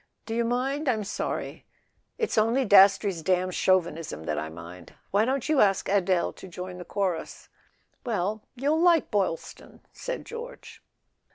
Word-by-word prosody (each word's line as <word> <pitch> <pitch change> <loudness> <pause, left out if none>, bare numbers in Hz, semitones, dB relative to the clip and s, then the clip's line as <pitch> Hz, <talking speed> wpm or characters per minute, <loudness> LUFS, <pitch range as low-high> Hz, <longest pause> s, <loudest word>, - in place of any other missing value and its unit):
"Do 225 - -5
you 235 +1 +1
mind? 265 +5 -1
I'm 220 -4 0
sorry." 200 - -4 0.5
"It's 450 -2 -1
only 230 +5 +2
Dastrey's 195 -3 +5
damned 185 +2 +1
chauvinism 165 - 0
that 75 -1 -2
I 80 - -4
mind. 85 +1 -11 0.2
Why 205 +3 +3
don't 265 +1 -1
you 305 -3 +3
ask 195 -2 +2
Adele 185 -3 +1
to - - -11
join 180 0 -7
the 175 - -8
chorus?" 185 -3 -3 0.5
"Well—you'll 235 - -1
like 340 -3 +4
Boylston," 195 -6 -3
said - - -5
George. 480 +2 -9
200 Hz, 145 wpm, -27 LUFS, 180-255 Hz, 0.5 s, Dastrey's